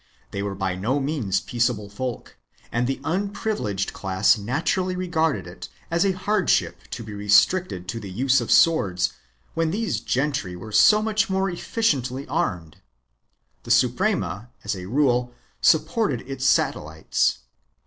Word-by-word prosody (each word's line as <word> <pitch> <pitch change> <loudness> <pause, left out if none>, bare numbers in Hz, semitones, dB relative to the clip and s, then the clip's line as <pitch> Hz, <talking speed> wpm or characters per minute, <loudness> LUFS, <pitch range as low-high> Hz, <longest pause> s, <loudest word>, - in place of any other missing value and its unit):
They 100 - -3
were 100 -1 -3
by 95 -1 -1
no 115 +10 -1
means 135 -10 -1
peaceable 120 -4 -1
folk 120 +4 -6 0.4
and 120 +1 0
the 135 - -2
unprivileged 190 - -2
class 95 +4 +2
naturally 160 - -1
regarded 165 - 0
it 90 0 -10 0.2
as 170 +1 +2
a 195 -1 +2
hardship 210 +3 +1
to 115 - -6
be 105 -1 -8
restricted 105 - +2
to 115 - -3
the 100 -3 -8
use 130 +6 +2
of 115 - -5
swords 95 - +3 0.4
when 165 -1 0
these 200 - -1
gentry 130 -7 -1
were 100 +5 -9
so 210 - +6
much 215 0 +1
more 190 0 0
efficiently 140 - -1
armed. 85 -5 -2 0.8
The - - -12
Suprema 110 +5 +1
as - - -2
a 90 -1 -7
rule 125 -1 +1 0.3
supported 160 - +2
its 135 0 -3
satellites. 80 +1 +1
125 Hz, 140 wpm, -24 LUFS, 100-165 Hz, 0.8 s, so